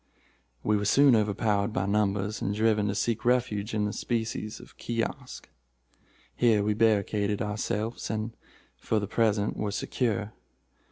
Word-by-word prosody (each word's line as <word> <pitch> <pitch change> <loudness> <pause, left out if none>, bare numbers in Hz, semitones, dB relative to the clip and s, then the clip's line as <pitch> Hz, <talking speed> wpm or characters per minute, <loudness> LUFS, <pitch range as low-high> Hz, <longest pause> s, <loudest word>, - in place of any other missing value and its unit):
We 105 0 +2
were 105 - -2
soon 135 +5 +6
overpowered 105 0 +1
by 95 - 0
numbers, 100 0 0
and 100 - -1
driven 110 -1 +2
to 100 - -1
seek 115 +1 -1
refuge 115 -4 +1
in 105 -1 +1
a 105 - -4
species 110 -2 -3
of - - -15
kiosk. 120 +3 -4 0.9
Here 110 -4 +3
we 105 +1 +1
barricaded 105 -1 +1
ourselves, 105 +1 -2
and, 110 +2 -3 0.4
for 110 - 0
the 105 - 0
present 105 -1 +1
were 105 - -1
secure. 105 0 -2
105 Hz, 145 wpm, -28 LUFS, 105-115 Hz, 0.9 s, soon